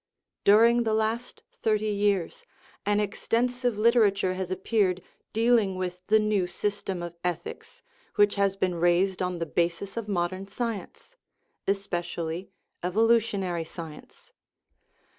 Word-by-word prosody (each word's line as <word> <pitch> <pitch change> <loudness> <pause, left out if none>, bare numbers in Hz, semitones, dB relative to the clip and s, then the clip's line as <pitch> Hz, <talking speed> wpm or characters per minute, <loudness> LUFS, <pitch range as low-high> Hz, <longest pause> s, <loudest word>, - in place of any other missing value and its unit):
During 230 +4 +6
the 220 -2 +1
last 220 +3 -2
thirty 215 -1 0
years 200 -4 0 0.4
an 205 0 +3
extensive 240 +3 0
litera 230 0 +5
ture 195 -2 -1
has 185 -1 -4
appeared 185 -1 0 0.3
dealing 225 -3 +3
with 180 -1 -3
the 220 - +5
new 210 -4 +1
system 195 -1 -3
of 175 0 -6
ethics 175 -1 -5 0.3
which 205 0 +4
has 200 -1 +1
been 185 -2 0
raised 175 +3 +2
on 180 -1 -1
the 165 - -2
basis 175 +5 -1
of 230 -2 -3
modern 185 0 -2
science 225 - -5 0.5
especially 175 -3 -2 0.3
evolutionary 200 -3 +1
science. 160 -1 -11
195 Hz, 120 wpm, -27 LUFS, 180-220 Hz, 0.5 s, During